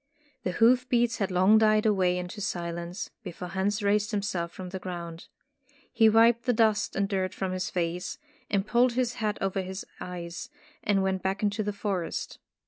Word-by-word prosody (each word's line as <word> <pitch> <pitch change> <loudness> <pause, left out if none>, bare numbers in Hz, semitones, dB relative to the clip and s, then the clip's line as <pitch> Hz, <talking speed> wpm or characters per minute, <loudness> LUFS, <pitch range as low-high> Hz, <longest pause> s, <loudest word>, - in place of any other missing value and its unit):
The 180 - -2
hoof 250 +4 +4
beats 240 -2 +2
had 195 - 0
long 190 +4 +5
died 215 0 +4
away 185 -4 +3
into 180 +4 -5
silence, 175 -1 -4
before 180 -3 -7
Hans 200 +3 -1
raised 205 +1 +2
himself 195 -5 -2
from 185 -1 -8
the 190 +1 -5
ground. 170 -2 -7 0.7
He 225 -2 +6
wiped 230 +2 +5
the 245 - +3
dust 220 -2 +2
and 195 0 +1
dirt 190 -2 -1
from 190 -1 -2
his 185 0 -2
face, 175 0 -2 0.5
pulled 240 +2 +3
his 245 -1 0
hat 210 -1 0
over 195 0 0
his 190 +1 -6
eyes, 170 -1 -6 0.3
and 195 -2 +2
went 190 -1 0
back 195 +2 -2
into 205 +1 +1
the 210 0 -1
forest. 200 -5 -3
195 Hz, 175 wpm, -28 LUFS, 180-215 Hz, 0.7 s, He